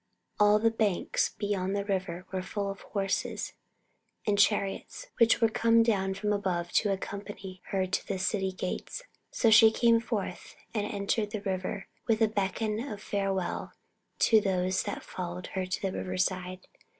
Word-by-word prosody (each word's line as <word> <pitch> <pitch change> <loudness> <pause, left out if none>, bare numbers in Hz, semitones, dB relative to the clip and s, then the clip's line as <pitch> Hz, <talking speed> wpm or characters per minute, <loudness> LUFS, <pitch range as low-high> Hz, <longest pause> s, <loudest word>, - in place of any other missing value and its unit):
all 210 0 +6
the 225 +1 +3
banks 215 -5 +1
beyond 200 -2 -1
the 200 0 -1
river 185 -3 -2
were 190 -1 -2
full 200 +1 -3
of 195 - -10
horses 195 -2 -2 0.7
and 205 -1 +2
chariots 205 - +1
which 230 0 +5
were 230 - +5
come 230 +1 +4
down 195 -4 +1
from 210 +1 0
above 180 -4 -1
to 205 - +2
accompany 195 -1 -6
her 190 -1 0
to 185 - -2
the 195 - -1
City 190 0 0
gates, 185 - -4 0.3
so 230 - +2
she 220 0 +9
came 230 +1 +4
forth 220 -6 -4 0.2
and 210 -2 -1
entered 205 +1 0
the 215 -1 -4
river 195 0 -3 0.2
with 220 -1 +3
a 225 - +5
beckon 210 +1 -1
of 230 -5 -5
farewell 195 -3 -2 0.4
to 220 -2 +5
those 185 -1 +1
that - - -5
followed 180 0 -5
her 185 -1 -2
to 185 - -2
the 190 -1 -2
river 185 0 -3
side. 185 0 -1
200 Hz, 165 wpm, -29 LUFS, 185-215 Hz, 0.7 s, she